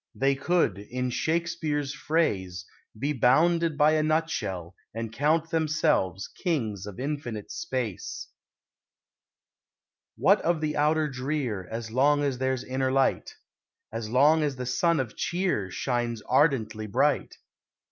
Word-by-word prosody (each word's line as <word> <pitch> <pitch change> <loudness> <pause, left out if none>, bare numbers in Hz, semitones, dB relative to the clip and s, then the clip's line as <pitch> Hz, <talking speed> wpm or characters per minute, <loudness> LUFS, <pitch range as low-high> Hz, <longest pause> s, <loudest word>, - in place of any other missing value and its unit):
They 135 +1 +2
could, 140 - +1
in 125 +4 -3
Shakespeare's 155 -2 -1
phrase, 95 - -1 0.3
be 140 +6 -1
bounded 160 +5 +3
by 150 +1 +5
a 155 0 +2
nut 160 +1 +1
shell 90 - -4 0.2
and 115 -1 -4
count 155 +5 +1
themselves 155 - +1
kings 110 - -2
of 105 +1 -8
infinite 130 -7 -4
space. 120 -8 -4 1.9
What - - +4
of 170 -1 +1
the 155 -1 -2
outer 150 +1 +2
drear, 130 -8 -3
As 115 0 -5
long 145 +4 +3
as 135 -3 -1
there's 130 -1 -1
inner 130 0 -1
light; 135 0 +1 0.6
As 115 -1 -4
long 145 +7 +5
as 145 -3 0
the 125 0 -5
sun 165 +6 +2
of 125 -5 -3
cheer 175 - -1
Shines 120 +1 -2
ardently 115 -6 +1
bright? 100 - +1
135 Hz, 130 wpm, -27 LUFS, 115-155 Hz, 1.9 s, by